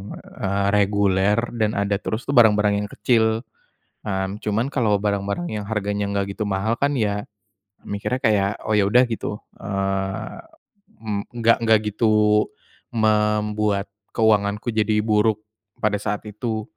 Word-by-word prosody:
eee, 100 Hz, +1 st, -3 dB
reguler 100 Hz, 0 st, +2 dB, 0.2 s
dan 110 Hz, -2 st, 0 dB
ada 100 Hz, 0 st, 0 dB
terus 110 Hz, +3 st, -3 dB
tuh 140 Hz, -, -2 dB
barang-barang 105 Hz, -3 st, +4 dB
yang -, -, -10 dB
kecil, 110 Hz, +1 st, +1 dB, 0.6 s
mmm, 95 Hz, 0 st, -2 dB
cuman 110 Hz, +3 st, 0 dB
kalau 110 Hz, -7 st, +1 dB
barang-barang 100 Hz, -, -1 dB
yang 105 Hz, -, -5 dB
harganya 105 Hz, -1 st, -2 dB
enggak 100 Hz, -1 st, -2 dB
gitu 105 Hz, -, -1 dB
mahal 100 Hz, +4 st, -1 dB
kan 140 Hz, +1 st, +1 dB
ya 105 Hz, -4 st, -1 dB, 0.6 s
mikirnya 100 Hz, +5 st, -3 dB
kayak, 100 Hz, -3 st, +3 dB
"Oh, 110 Hz, -, -3 dB
ya 105 Hz, -2 st, +3 dB
udah." 125 Hz, +5 st, +5 dB
Gitu, 115 Hz, -3 st, -3 dB, 0.2 s
eee, 95 Hz, -1 st, -3 dB, 0.6 s
mmm, 105 Hz, -2 st, -2 dB
enggak 115 Hz, -1 st, +4 dB
enggak 110 Hz, -1 st, +5 dB
gitu 105 Hz, 0 st, +3 dB, 0.5 s
membuat 105 Hz, -2 st, +1 dB, 0.3 s
keuanganku 105 Hz, 0 st, +2 dB
jadi 110 Hz, -1 st, +1 dB
buruk 110 Hz, 0 st, +2 dB, 0.4 s
pada 105 Hz, -1 st, +1 dB
saat 105 Hz, +1 st, -3 dB
itu. 110 Hz, +1 st, -3 dB
105 Hz, 135 wpm, -22 LUFS, 100-110 Hz, 0.6 s, udah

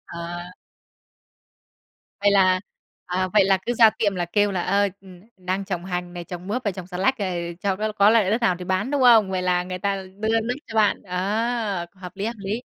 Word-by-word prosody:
Ờ. 170 Hz, -, -5 dB, 2.0 s
Vậy 205 Hz, 0 st, +4 dB
là, 185 Hz, -2 st, +4 dB, 0.5 s
à, 185 Hz, +1 st, -1 dB
vậy 210 Hz, -2 st, +5 dB
là 195 Hz, 0 st, +3 dB
cứ 240 Hz, -, 0 dB
ra 225 Hz, -2 st, +7 dB
tiệm 210 Hz, -2 st, -1 dB
là 180 Hz, -1 st, -1 dB
kêu 205 Hz, +4 st, +1 dB
là, 180 Hz, -2 st, -1 dB
ơ, 200 Hz, +2 st, +2 dB, 0.5 s
đang 185 Hz, +1 st, -3 dB
trồng 180 Hz, -3 st, -4 dB
hành 180 Hz, -1 st, -4 dB
này, 175 Hz, -1 st, -7 dB
trồng 180 Hz, +1 st, -8 dB
mướp 235 Hz, +6 st, -2 dB
và 205 Hz, -, +1 dB
trồng 185 Hz, -2 st, -8 dB
xà 180 Hz, -1 st, -7 dB
lách 260 Hz, +8 st, +2 dB
này 175 Hz, -4 st, -3 dB
cho 195 Hz, -1 st, 0 dB
có 215 Hz, +2 st, -2 dB
có 205 Hz, 0 st, +5 dB
loại 220 Hz, -4 st, +3 dB
đất 225 Hz, +3 st, +1 dB
nào 185 Hz, -5 st, +3 dB
thì 180 Hz, -, -7 dB
bán, 190 Hz, +7 st, -1 dB
đúng 285 Hz, -2 st, +1 dB
không? 225 Hz, -5 st, +6 dB
Vậy 185 Hz, -1 st, -1 dB
là 180 Hz, -1 st, +1 dB
người 185 Hz, 0 st, -5 dB
ta 195 Hz, 0 st, -1 dB, 0.2 s
đưa 220 Hz, +1 st, +2 dB
đất 235 Hz, +2 st, -2 dB
cho 225 Hz, -, -10 dB
bạn. 210 Hz, -2 st, +3 dB
A! 200 Hz, +1 st, -1 dB
Hợp 185 Hz, -2 st, -10 dB
lý, 200 Hz, -, -3 dB
hợp 230 Hz, -, -3 dB
lý. 205 Hz, +4 st, -4 dB
195 Hz, 220 wpm, -23 LUFS, 180-215 Hz, 2.0 s, ra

